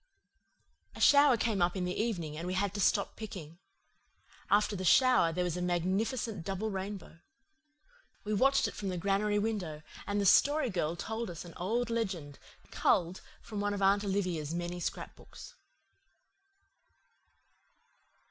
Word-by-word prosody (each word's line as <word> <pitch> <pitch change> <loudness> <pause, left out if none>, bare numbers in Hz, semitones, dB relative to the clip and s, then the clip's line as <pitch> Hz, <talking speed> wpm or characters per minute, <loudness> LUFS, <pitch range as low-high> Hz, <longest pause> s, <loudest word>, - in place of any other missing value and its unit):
A - - -10
shower 285 -3 +6
came 220 -4 0
up 175 +2 +1
in 180 - -1
the 180 - -2
evening 175 -9 -2
and 165 +3 -5
we 185 - -2
had 200 +1 0
to 205 - -3
stop 200 +1 +1
picking. 175 -7 -9 0.9
After 205 0 +3
the 185 - -4
shower 250 -3 +5
there 180 +2 -1
was 175 -2 -2
a 180 - -3
magnificent 190 +4 -1
double 195 +4 -3
rainbow. 190 -3 -6 1.0
We 215 - -2
watched 270 +6 +3
it - - -6
from 200 - -4
the 180 - -3
granary 200 +3 +1
window, 195 -8 -3 0.2
and 205 0 -1
the 200 - 0
Story 285 +5 +4
Girl 170 -3 -1
told 220 +5 -4
us 170 0 -8
an 170 - -11
old 230 +6 -1
legend, 190 -11 -3 0.3
culled 175 +1 +1 0.2
from 210 -2 -5
one 205 0 -1
of 200 - -5
Aunt 200 +1 +4
Olivia's 180 -6 -2
many 175 +1 -4
scrapbooks. - - -7
195 Hz, 150 wpm, -31 LUFS, 175-215 Hz, 1.0 s, shower